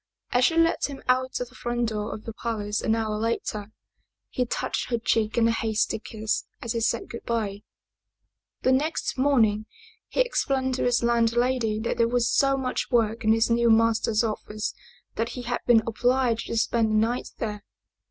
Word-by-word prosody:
As 250 Hz, 0 st, +4 dB
she 330 Hz, -, +2 dB
let 330 Hz, 0 st, +3 dB
him 280 Hz, -1 st, -7 dB
out 255 Hz, +1 st, +1 dB
of 245 Hz, -1 st, -4 dB
the -, -, -21 dB
front 240 Hz, -2 st, -2 dB
door 210 Hz, -1 st, -3 dB
of 215 Hz, -, -7 dB
the 225 Hz, -, -6 dB
palace 215 Hz, -3 st, -3 dB
an 220 Hz, -, +1 dB
hour 215 Hz, -2 st, -1 dB
later, 220 Hz, -2 st, -2 dB, 0.6 s
he 250 Hz, -1 st, -1 dB
touched -, -, -2 dB
her 235 Hz, -, +1 dB
cheek 225 Hz, -1 st, 0 dB
in 230 Hz, -1 st, +4 dB
a -, -, +3 dB
hasty 225 Hz, -1 st, 0 dB
kiss 220 Hz, 0 st, -3 dB
as 235 Hz, -, -4 dB
he 230 Hz, -, -1 dB
said 230 Hz, 0 st, 0 dB
good 235 Hz, -, -8 dB
by. 210 Hz, -4 st, -2 dB, 1.0 s
The 260 Hz, -, +4 dB
next 310 Hz, +3 st, 0 dB
morning, 225 Hz, -6 st, +3 dB, 0.4 s
he -, -, +1 dB
explained 270 Hz, -, 0 dB
to 255 Hz, -, -1 dB
his 245 Hz, -1 st, +2 dB
landlady 235 Hz, -1 st, +2 dB
that 230 Hz, -, -2 dB
there 230 Hz, -, +3 dB
was 240 Hz, 0 st, +1 dB
so 275 Hz, -1 st, +3 dB
much 255 Hz, -1 st, -2 dB
work 230 Hz, -1 st, +1 dB
in 220 Hz, -, +4 dB
his 225 Hz, +1 st, +3 dB
new 235 Hz, 0 st, +3 dB
master's 225 Hz, 0 st, +3 dB
office 215 Hz, -1 st, -3 dB, 0.4 s
that 230 Hz, +1 st, 0 dB
he 250 Hz, -, -5 dB
had 245 Hz, 0 st, -2 dB
been 230 Hz, -2 st, +6 dB
obliged 245 Hz, +1 st, +1 dB
to 230 Hz, -, -2 dB
spend 225 Hz, 0 st, +2 dB
the 215 Hz, -, +1 dB
night 245 Hz, +1 st, -3 dB
there. 210 Hz, -2 st, -4 dB
230 Hz, 190 wpm, -26 LUFS, 220-250 Hz, 1.0 s, been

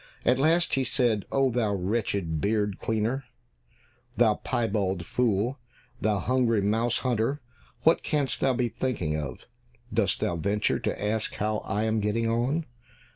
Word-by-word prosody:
At 125 Hz, +1 st, +3 dB
last 165 Hz, +4 st, +3 dB
he 135 Hz, -, +2 dB
said, 120 Hz, -5 st, +1 dB
"Oh, 135 Hz, -1 st, +2 dB
thou 110 Hz, -4 st, +1 dB
wretched 95 Hz, -5 st, -1 dB
beard 105 Hz, -2 st, 0 dB
cleaner, 115 Hz, +5 st, -1 dB, 0.9 s
thou -, -, +5 dB
piebald 100 Hz, -6 st, -1 dB
fool, 120 Hz, -, 0 dB, 0.4 s
thou 105 Hz, -1 st, +2 dB
hungry 120 Hz, +2 st, +2 dB
mouse 110 Hz, +4 st, +1 dB
hunter, 125 Hz, +3 st, +1 dB, 0.4 s
what 165 Hz, -, +5 dB
canst 145 Hz, -4 st, 0 dB
thou 135 Hz, -, +2 dB
be 125 Hz, 0 st, +1 dB
thinking 115 Hz, -9 st, -2 dB
of? 70 Hz, -5 st, -5 dB, 0.5 s
Dost 100 Hz, -4 st, +1 dB
thou 85 Hz, -, -1 dB
venture 100 Hz, +5 st, 0 dB
to -, -, -2 dB
ask 110 Hz, +1 st, -1 dB
how 105 Hz, +1 st, -1 dB
I 105 Hz, +2 st, -2 dB
am 110 Hz, 0 st, +1 dB
getting 105 Hz, +2 st, 0 dB
on? 125 Hz, +8 st, 0 dB
110 Hz, 145 wpm, -27 LUFS, 100-125 Hz, 0.9 s, thou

